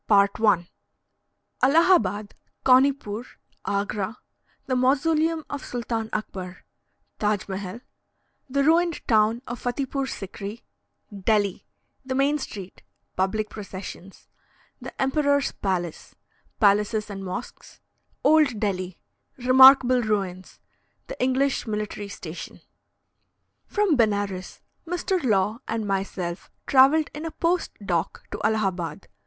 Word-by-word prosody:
ALLAHABAD 255 - +3 0.3
CAUNIPOOR 255 -4 +3 0.4
AGRA 200 +2 -2 0.5
THE 255 - -1
MAUSOLEUM 310 +5 +2
OF 285 - -6
SULTAN 230 -2 -3
AKBAR 185 -4 -5 0.6
TAJ 210 -2 0
MEHAL 195 +3 -5 0.7
THE 280 +2 +1
RUINED 335 +2 +2
TOWN 225 +1 +3
OF 240 +1 -6
FATIPOOR 270 +2 -2
SIKRI 200 +2 -7 0.5
DELHI 200 -1 0 0.4
THE 260 0 -3
MAIN 280 +3 +2
STREET 195 -8 -8 0.3
PUBLIC 210 +3 -1
PROCESSIONS 195 -2 -9 0.5
THE - - -7
EMPEROR'S 285 +1 +2
PALACE 175 -4 -3 0.4
PALACES 210 0 +2
AND 195 -1 -6
MOSQUES 190 +6 -7 0.4
OLD 300 -8 +4
DELHI 185 -4 -2 0.4
REMARKABLE 255 0 +7
RUINS 195 -4 -3 0.5
THE - - -8
ENGLISH 260 0 +1
MILITARY 210 -1 -4
STATION. 175 -4 -8 1.1
From 410 -6 +2
Benares, 205 -5 -1 0.3
Mr. 355 0 -1
Law 215 -1 +1
and 225 -1 -2
myself 190 -3 -3 0.2
travelled 280 +3 +5
in 300 - -6
a 325 - -3
post 340 +2 0
dock 175 -1 -1
to - - -5
Allahabad. 195 -4 -1
220 Hz, 100 wpm, -25 LUFS, 195-275 Hz, 1.1 s, REMARKABLE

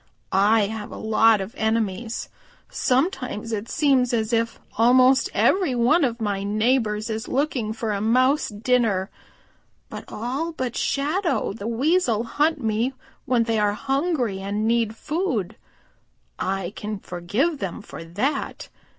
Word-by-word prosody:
I 210 +4 +4
have 210 +1 -3
a - - -7
lot 220 -1 +4
of 190 +5 -6
enemies. 220 -1 -1 0.4
Sometimes 255 - -1
it 220 +1 -3
seems 265 -5 +2
as 220 0 -1
if 230 0 0 0.2
almost 255 +4 +5
every 365 -10 +2
one 250 +8 +3
of 240 -3 0
my 205 -3 -1
neighbors 215 +1 +1
is 220 +2 -4
looking 260 -5 -1
for 220 0 -3
a 200 -1 -2
Mouse 255 +6 +3
dinner. 210 -3 +1 0.8
But - - -7
all 270 +9 -3
but 255 -5 -3
Shadow 310 - 0
the 200 +1 -6
Weasel 245 -1 +1
hunt 300 +6 +1
me 225 +4 0 0.3
when 245 -2 +2
they 225 -1 0
are 205 -1 +2
hungry 270 - -1
and 205 +3 -2
need 230 -1 +1
food. 255 - -2 0.8
I 190 0 -2
can 210 0 -4
forgive 205 - -2
them 190 -4 -5
for - - -9
that. 205 - -3
230 Hz, 140 wpm, -23 LUFS, 210-260 Hz, 0.8 s, almost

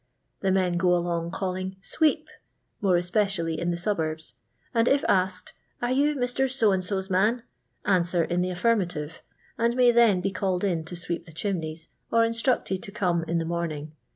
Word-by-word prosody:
The 195 - +1
men 185 -2 +2
go 180 0 +3
along 170 -1 -1
calling 185 0 -3
"sweep," 305 +10 +1 0.5
more 190 -3 +3
especially 175 -2 0
in 175 - -1
the 170 - -1
suburbs, 160 -4 -2 0.4
and 230 0 +3
if 280 0 +3
asked 185 -1 0 0.3
"Are 240 +1 -1
you 290 +3 +2
Mr. 260 +1 0
So 230 -5 +3
and 190 -1 0
So's 190 0 -2
manT' 215 +6 +2 0.4
answer 175 -3 +2
in 175 +2 0
the 180 - 0
affirmative, 175 -5 -1 0.4
and 235 +1 +2
may 250 -1 +5
then 230 -5 +5
be 195 +2 -1
called 185 -1 -1
in 170 -5 0
to 175 - -7
sweep 170 0 -4
the - - -11
chimneys, 160 -2 -4 0.2
or 230 0 +4
instructed 230 -4 0
to 200 - -8
come 180 -5 0
in 170 - 0
the 165 - -1
morning. 160 -3 -3
185 Hz, 180 wpm, -26 LUFS, 170-215 Hz, 0.5 s, may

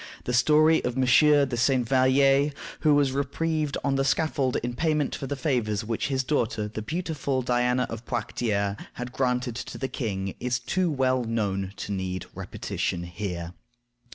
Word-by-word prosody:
The 125 - -3
story 155 +6 +4
of 125 - -2
M. 130 - +2
de 140 0 +5
St. 125 0 +2
Vallier, 135 +2 +4 0.3
who 150 -2 +4
was 140 -2 +3
reprieved 150 +2 -1
on 140 -1 +1
the 135 - +2
scaffold 140 -2 +1
in 120 0 -2
payment 150 +1 0
for 135 - -4
the 145 - -2
favors 120 -7 0
which 115 0 -1
his 135 -2 0
daughter, 115 -6 0
the 110 +1 -6
beautiful 145 - -2
Diana 125 +1 +1
of 115 +1 -8
Poictiers, 105 -4 -1 0.2
had 125 +1 -6
granted 125 -2 0
to - - -6
the 130 - -2
king, 95 -7 -3
is 125 -1 0
too 170 +9 0
well 130 -3 +1
known 100 -4 -2
to - - -5
need 95 -2 -3
repetition 85 - -3
here. 85 -1 -5
125 Hz, 165 wpm, -26 LUFS, 115-140 Hz, 0.3 s, de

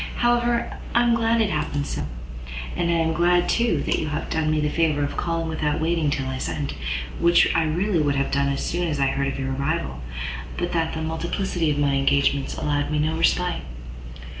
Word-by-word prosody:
However, 240 0 +1 0.2
I 240 - +5
am 240 -1 +3
glad 230 0 +2
it 210 -3 +1
happened 145 -1 -1
so. - - -3 0.7
And 170 - 0
I - - +3
am 165 -1 +1
glad, 175 +2 +3
too, 235 0 +1
that - - 0
you 155 - -2
have 150 +1 -3
done 160 -1 +1
me 155 0 +2
the 150 - +1
favour 150 -1 +1
of 145 - -3
calling 165 -1 -1
without 155 -2 -1
waiting 160 -1 +1
till 140 -2 -1
I 130 0 -3
sent, 140 +1 -3 0.5
which 170 0 +5
I 165 - +2
really 175 +4 +1
would 145 -1 +1
have 140 0 0
done 140 0 +2
as 140 - -2
soon 175 +1 -1
as 145 -3 -2
I 135 -1 +3
heard 140 0 0
of 135 - -3
your 135 0 -2
arrival, 140 - -2 0.6
but 175 0 -1
that 165 -1 0
the 160 - -3
multiplicity 165 +1 -1
of 145 - 0
my 145 -1 +2
engagements 140 0 +1
allowed 145 -1 0
me 150 - 0
no 155 +2 +1
respite." 175 +2 +1
160 Hz, 215 wpm, -24 LUFS, 145-175 Hz, 0.7 s, I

